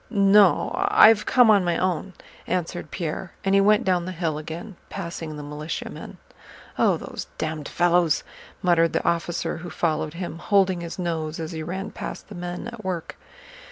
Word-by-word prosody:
"No, 200 -2 +5 0.2
I've 225 - +6
come 245 -3 +6
on 200 -3 +5
my 175 -1 0
own," 185 +1 -1 0.3
answered 175 -2 -2
Pierre, 170 +1 -4
and 195 - +2
he 195 - +6
went 210 +1 +4
down 180 -2 +1
the 185 - -4
hill 165 -4 -2
again, 165 +6 -7
passing 170 -4 -6
the 150 - -7
militiamen. 150 +2 -6 0.6
"Oh, - - +4
those - - -7
damned 155 -2 -3
fellows!" 175 -2 +2 0.4
muttered 165 -2 +3
the - - -1
officer 170 0 -1
who 175 +2 -7
followed 155 -1 -1
him, 170 -2 -5
holding 190 -2 +2
his 170 -1 -6
nose 165 -3 -3
as 160 +1 -4
he 160 -1 -5
ran 190 +6 -5
past - - -7
the - - -8
men 175 +4 -5
at 235 -2 -10
work. 180 -3 -4
175 Hz, 170 wpm, -24 LUFS, 165-195 Hz, 0.6 s, I've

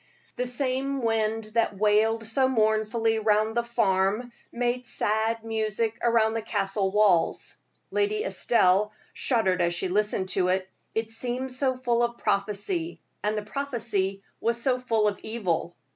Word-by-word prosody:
The 250 - -2
same 265 +1 0
wind 225 -1 0
that 225 -3 +1
wailed 215 +2 +2
so 245 +4 +2
mournfully 220 -1 +1
round 215 0 +2
the 240 - +3
farm 220 0 0 0.2
made 245 +1 -2
sad 220 +1 0
music 220 0 -1
round 225 -2 +3
the 225 - -1
Castle 195 -2 -1
walls. 195 -4 +2 0.4
Lady 420 +1 0
Estelle 210 - +3 0.2
shuddered 190 -8 +1
as 175 0 +2
she 185 +2 0
listened 200 -1 0
to 185 -1 +1
it; 185 +1 0 0.3
it 225 0 -1
seemed 250 +3 -2
so 260 0 0
full 240 -2 +1
of 235 0 0
prophecy, 215 - -1 0.2
and 210 +1 -1
the 210 - -2
prophecy 215 -6 -2 0.2
was 235 +1 0
so 250 +1 +1
full 225 -4 +1
of 205 - -2
evil. 185 -6 -2
225 Hz, 145 wpm, -26 LUFS, 210-240 Hz, 0.4 s, the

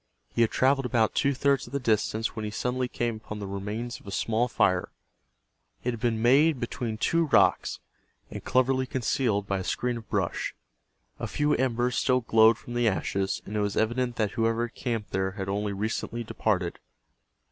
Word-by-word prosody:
He - - +1
had 115 - +4
traveled 135 0 +2
about 115 -2 +2
two 140 -1 +1
thirds 140 0 +1
of - - -13
the 140 - 0
distance 110 -1 0
when 110 - -4
he 105 - -2
suddenly 125 +4 -1
came 120 -2 -2
upon 110 -1 -8
the 105 - -5
remains 105 +5 -4
of - - -19
a - - -6
small 115 +4 +1
fire. 90 -6 +1 0.9
It 125 - 0
had 115 - -6
been 115 -2 0
made 140 +4 +5
between 120 -2 -3
two 165 +8 +2
rocks, 140 - +3 0.5
and - - -7
cleverly 130 +1 +2
concealed 120 -5 0
by 100 -1 -1
a - - -4
screen 125 +5 -1
of 115 - -11
brush. - - -1 0.6
A - - -3
few 150 0 +1
embers 125 -1 +1
still 130 -1 +2
glowed 110 -1 +5
from 120 - -9
the 120 -1 +2
ashes, 95 -1 -1
and 105 - -6
it - - +1
was 100 -1 -1
evident 120 +2 0
that 105 -3 0
whoever 115 +1 +1
had 120 - -11
camped 115 -4 -3
there 95 0 -1
had 95 -1 -5
only 100 +1 -1
recently 110 +3 -3
departed. 95 -5 -1
115 Hz, 190 wpm, -27 LUFS, 105-125 Hz, 0.9 s, made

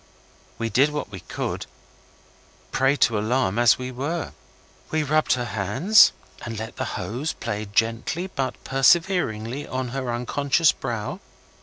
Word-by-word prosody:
We 115 0 -2
did 135 +8 +4
what 150 -8 -5
we 95 - -7
could, - - -4
a - - -30
prey 135 +1 +3
to 115 -6 +2
alarm 115 -1 0
as 120 -2 +5
we 130 0 -5
were. 145 +7 -3 0.6
We 155 -1 0
rubbed 155 +2 +2
her 125 -1 -1
hands 120 - +4 0.3
and 115 -1 -5
let 110 +2 -6
the 130 - -2
hose 115 - -3
play 105 +1 -4
gently 115 - 0
but 135 -8 -3
perseveringly 135 - +2
on 130 -1 -3
her 130 -1 -3
unconscious 140 +6 +2
brow. 115 -7 -4
130 Hz, 145 wpm, -24 LUFS, 115-145 Hz, 0.6 s, as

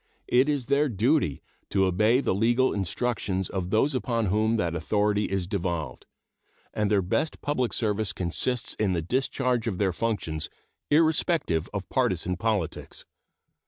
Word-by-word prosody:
It 130 +4 +3
is 145 -4 0
their 140 +2 +2
duty 115 - +1 0.3
to 95 -1 +2
obey 105 +8 +3
the - - 0
legal 120 +6 +2
instructions 95 -1 -2
of 90 -2 -3
those 125 +8 +2
upon 120 -3 0
whom 110 +4 +1
that 85 -5 -1
authority 105 +5 +1
is 95 -2 -2
devolved, 85 -8 -3 0.7
and 105 -1 0
their 100 -2 +2
best 125 - -1
public 130 -5 0
service 105 -3 -1
consists 115 +7 -1
in 100 -3 0
the 85 -2 -1
discharge 125 - 0
of 100 -5 -2
their 95 -2 +1
functions 95 -8 -2 0.4
irrespective 155 - +2
of 100 -2 -4
partisan 95 -8 0
politics. 105 -4 -3
105 Hz, 145 wpm, -26 LUFS, 95-125 Hz, 0.7 s, It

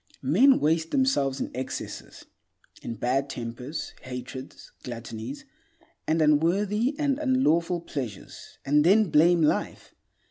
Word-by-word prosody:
Men 240 - +5
waste 160 +2 +1
themselves 145 - +1
in - - -4
excesses; 130 +2 -6 0.6
in 115 - -5
bad 130 +5 -1
tempers, 125 +5 -6
hatreds, 130 +1 -8
gluttonies, 120 +1 -7 0.6
and 160 0 +2
unworthy 200 - +2
and 285 -2 0
unlawful 180 - +1
pleasures, 125 - -7
and 150 +2 +3
then 195 +1 +4
blame 170 +2 +5
life. 150 - -1
150 Hz, 110 wpm, -26 LUFS, 130-190 Hz, 0.6 s, Men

